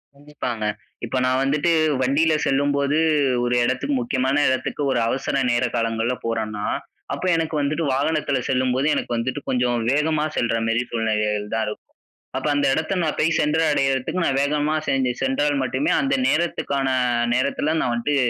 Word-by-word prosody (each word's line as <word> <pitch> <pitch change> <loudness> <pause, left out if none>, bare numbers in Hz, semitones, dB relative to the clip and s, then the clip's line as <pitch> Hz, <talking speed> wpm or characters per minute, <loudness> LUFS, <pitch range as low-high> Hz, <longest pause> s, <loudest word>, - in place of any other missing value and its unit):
கண்டிப்பாங்க. 140 -6 -5 0.4
இப்ப 130 - -3
நான் 130 +1 +2
வந்துட்டு 150 +5 +1 0.3
வண்டில 150 +5 +2
செல்லும்போது, 140 +2 +1 0.4
ஒரு 120 0 +1
இடத்துக்கு 135 +3 0
முக்கியமான 130 +4 +1
இடத்துக்கு, 130 +3 -2
ஒரு 120 - +1
அவசர 135 +3 -2 0.2
நேர 120 +1 +2
காலங்கள்ல 115 +2 0
போறன்னா, 110 -2 -2 0.5
அப்ப - - -4
எனக்கு 160 -1 -1
வந்துட்டு 150 +4 -1
வாகனத்துல 145 0 0
செல்லும்போது, 130 +2 +1
எனக்கு 120 - -2
வந்துட்டு 130 +4 -2
கொஞ்சம் 125 -2 +1
வேகமா 150 +1 +1
செல்ற 115 -1 +1
மேரி 115 +2 +1
சூழ்நிலைகள் 105 -2 -1
தான் 110 - 0
இருக்கும். 105 - -7 0.5
அப்ப - - -2
அந்த 145 -1 +1
இடத்த 160 +5 -1
நான் 155 - -1
போய் 160 +1 +2
சென்று 150 +2 +2
அடையறதுக்கு 135 +5 0
நான் 135 0 +1
வேகமா 150 +2 0
சென்று 130 -2 +1
சென்றால் 145 +2 +1
மட்டுமே, 130 +3 0
அந்த 275 +1 0
நேரத்துக்கான 140 -5 0 0.5
நேரத்துல, 145 +4 0
நான் 120 - 0
வன்ட்டு 130 +5 0
135 Hz, 150 wpm, -22 LUFS, 120-150 Hz, 0.5 s, நான்